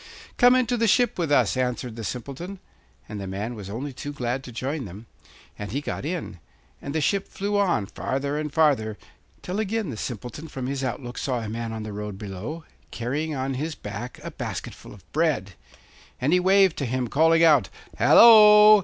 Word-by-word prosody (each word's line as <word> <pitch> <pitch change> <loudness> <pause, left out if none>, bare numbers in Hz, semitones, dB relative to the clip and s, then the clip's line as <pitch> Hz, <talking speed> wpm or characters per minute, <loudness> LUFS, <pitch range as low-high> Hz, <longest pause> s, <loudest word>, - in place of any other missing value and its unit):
'Come 245 +1 +6
into 250 -1 +1
the 230 0 +2
ship 240 -1 +2
with 165 -4 -1
us,' 145 - +3
answered 125 -2 -2
the 115 - -7
Simpleton; 140 - -6 0.5
and 105 -1 -6
the 95 - -5
man 100 +5 -4
was 100 -4 -8
only 130 +7 -5
too 145 +3 -6
glad 130 -2 -3
to 125 - -9
join 130 +4 -3
them, 100 +4 -10 0.5
and 105 -1 -5
he 135 - -1
got 145 - -5
in; 165 - -4 0.4
and 140 +2 -6
the 160 - +1
ship 195 +6 0
flew 205 +1 -3
on, 180 - +1
farther 135 +7 -3
and 150 0 -3
farther, 135 -9 +2 0.5
till 185 +3 -3
again 220 -4 -2
the 110 - -7
Simpleton 125 +7 -6
from 135 -4 -6
his 135 +1 -3
outlook 125 -1 -4
saw 125 -3 -2
a 110 - -5
man 115 +1 -4
on 110 -1 -5
the 105 -1 -6
road 105 -1 -6
below, 105 - -6 0.3
carrying 145 +6 -3
on 135 0 -2
his 150 +4 -3
back 110 +4 -7
a - - -6
basket - - -5
full - - -13
of 95 - -19
bread. 145 - 0 0.7
And 140 +6 +1
he 180 - +5
waved 190 -1 +4
to 140 - -2
him, 125 0 -1
calling 165 +6 +4
out: 150 -9 +5 0.3
'Hallo! 215 -2 +8
135 Hz, 195 wpm, -25 LUFS, 115-165 Hz, 0.7 s, Hallo